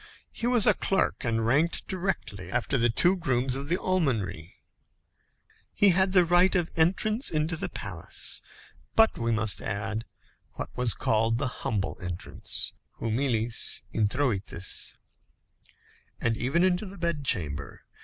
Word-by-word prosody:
He 235 - -3
was 240 -4 +5
a - - +6
clerk, 195 - 0
and 115 -2 0
ranked 150 +8 +1
directly 175 - -3
after 135 - 0
the 120 -2 +3
two 175 +11 +4
grooms 130 -7 0
of 140 +2 -5
the 175 - +2
almonry. 115 - -1 1.2
He 205 - +5
had 190 +1 +3
the 180 -2 +6
right 175 +3 +4
of 175 -2 0
entrance 210 - +2
into 155 +1 -1
the - - -4
palace, 90 -5 -3 0.5
but 225 0 +4
we 115 0 0
must 110 -2 +2
add, 110 +2 -3 0.5
what - - -7
was 125 -2 +2
called 115 +1 +1
the 140 +2 -1
humble 100 -4 -2
entrance 90 -1 -4 0.3
humilis 115 -1 0
introïtus 105 -5 0 1.2
and 115 -1 0
even 135 +10 +1
into 185 +2 +1
the 195 +1 -10
bed 170 -4 -2
chamber. 75 - -2
130 Hz, 135 wpm, -27 LUFS, 110-175 Hz, 1.2 s, a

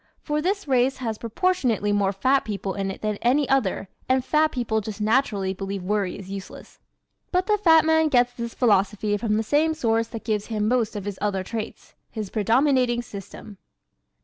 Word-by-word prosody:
For 300 0 -1
this 395 +2 -1
race 260 0 +2
has 225 -4 -4
proportionately 235 - 0
more 200 -1 +2
fat 260 +8 +2
people 200 -2 -4
in 195 -1 -3
it 195 - -8
than 210 -1 -1
any 265 +4 +2
other 230 -8 0 0.2
and 260 0 +2
fat 310 0 +2
people 230 -3 -1
just 215 0 -7
naturally 210 -4 +1
believe 195 0 -5
worry 200 -1 -1
is 195 -1 -10
useless. 195 -1 -9 0.5
But 365 0 +1
the 420 0 +1
fat 325 -5 +5
man 320 0 +3
gets 245 -4 +3
this 235 -1 -6
philosophy 205 -2 +2
from 215 -1 0
the 220 - 0
same 310 +7 +2
source 230 -5 +1
that 225 -2 -8
gives 210 -2 -1
him 215 -2 -1
most 235 -3 +1
of 205 -2 -5
his 205 -2 -5
other 195 -2 -1
traits 220 +2 -7 0.2
his 215 -4 -6
predominating 240 +2 +2
system. 200 -1 -10
225 Hz, 185 wpm, -24 LUFS, 205-265 Hz, 0.5 s, fat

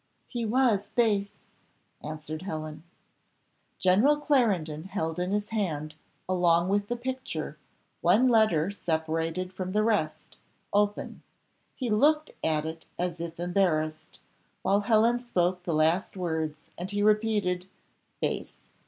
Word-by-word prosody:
"He 240 -3 -3
was 220 -4 +2
base," 205 -4 +1 0.6
answered 155 +1 -6
Helen. 155 -5 -5 1.0
General 210 +11 +4
Clarendon 200 - +1
held 165 -4 -3
in 180 +1 -1
his 210 0 -1
hand, 155 -9 -2 0.3
along 175 -1 +3
with 200 +1 +1
the 240 - -1
picture, 240 - -5 0.4
one 205 +9 +5
letter 215 -8 +3
separated 165 0 -2
from 185 0 -4
the 210 0 +3
rest, 205 -9 -1 0.4
open; 205 0 0 0.5
he 250 -4 -2
looked 300 +8 +3
at 155 -1 +1
it 160 0 -7
as 175 -1 -2
if 170 0 -6
embarrassed, 155 -4 0 0.4
while 200 +1 +3
Helen 225 +3 +3
spoke 180 -7 0
the 170 - 0
last 165 +6 +2
words, 160 -4 -3
and 180 +2 -4
he 205 0 0
repeated, 210 -4 +2 0.5
"Base! - - -3
185 Hz, 125 wpm, -28 LUFS, 160-215 Hz, 1.0 s, one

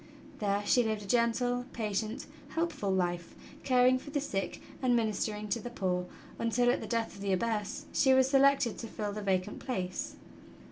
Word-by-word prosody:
There 205 -1 0
she 245 - +5
lived 220 -2 -1
a - - -9
gentle, 245 +2 +1
patient, 215 0 -2 0.3
helpful 325 -11 -1
life, 175 -2 -1 0.3
caring 255 0 +4
for 290 - -10
the 290 0 0
sick 200 -9 -3 0.2
and 250 -2 +3
ministering 215 -1 -1
to 200 - 0
the 245 - -6
poor, 180 -6 -1 0.3
until, 245 +1 +3
at - - -1
the - - -5
death 230 -1 -1
of 195 - -11
the 200 -1 0
Abbess, 220 +7 -1
she 265 - +4
was 260 0 +5
selected 275 -3 +4
to 230 - -5
fill 210 -1 -4
the 210 - -4
vacant 190 0 0
place. 185 -8 -3
225 Hz, 180 wpm, -31 LUFS, 200-250 Hz, 0.3 s, she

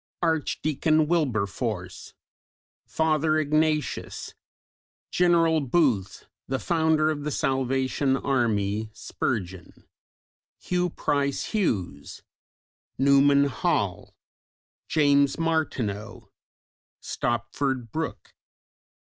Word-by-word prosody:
Archdeacon 155 -1 +1
Wilberforce; 110 - -2 0.7
Father 155 -1 +1
Ignatius; 155 0 -1 0.8
General 170 -2 +3
Booth, 125 - 0 0.2
the 135 - -1
founder 160 0 +2
of 145 -2 -4
the 150 - -2
Salvation 135 0 0
Army; 110 -6 0
Spurgeon; 95 -6 -4 0.7
Hugh 180 0 -1
Price 140 -3 -1
Hughes; 95 - -2 0.7
Newman 140 +1 +5
Hall; 140 - -1 0.7
James 140 -2 +3
Martineau; 135 -11 -2 0.7
Stopford 120 0 -2
Brooke. 160 0 -5
140 Hz, 70 wpm, -26 LUFS, 120-155 Hz, 0.8 s, Newman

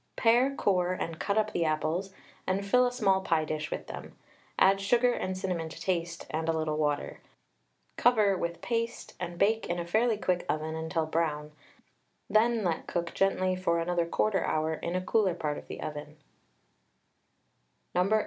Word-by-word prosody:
Pare, 245 +4 +3
core, 180 -5 +1
and 165 -3 -4
cut 200 +1 0
up 215 0 +2
the 170 - +1
apples, 160 +4 -1 0.4
and 195 +1 0
fill 250 +5 +4
a - - -2
small 195 -6 +2
pie 165 -4 +1
dish 155 0 -3
with - - -4
them; - - -9 0.4
add 195 +1 +5
sugar 240 +5 +3
and 185 -5 -3
cinnamon 180 -4 -2
to - - -10
taste, 170 -2 -2
and 160 +1 -1
a - - +3
little 155 -1 -1
water. 150 -1 -1 0.8
Cover 215 -5 +4
with 170 -1 -4
paste, 230 0 -2
and 175 -1 -5
bake 220 +4 +2
in 175 - 0
a 170 - -3
fairly 220 +5 +2
quick 180 -3 0
oven 155 +1 -1
until 160 0 -1
brown, 155 -2 -1 0.8
then 225 +1 +3
let 170 -3 -1
cook 170 -1 -2
gently 185 -1 +1
for 180 -2 +1
another 170 0 0
1/4 195 +2 +1
hour 155 +1 0
in 170 +2 -4
a 185 0 -2
cooler 195 -5 +2
part 150 -4 -2
of - - -15
the - - -7
oven. 150 0 -6
180 Hz, 170 wpm, -29 LUFS, 160-205 Hz, 0.8 s, add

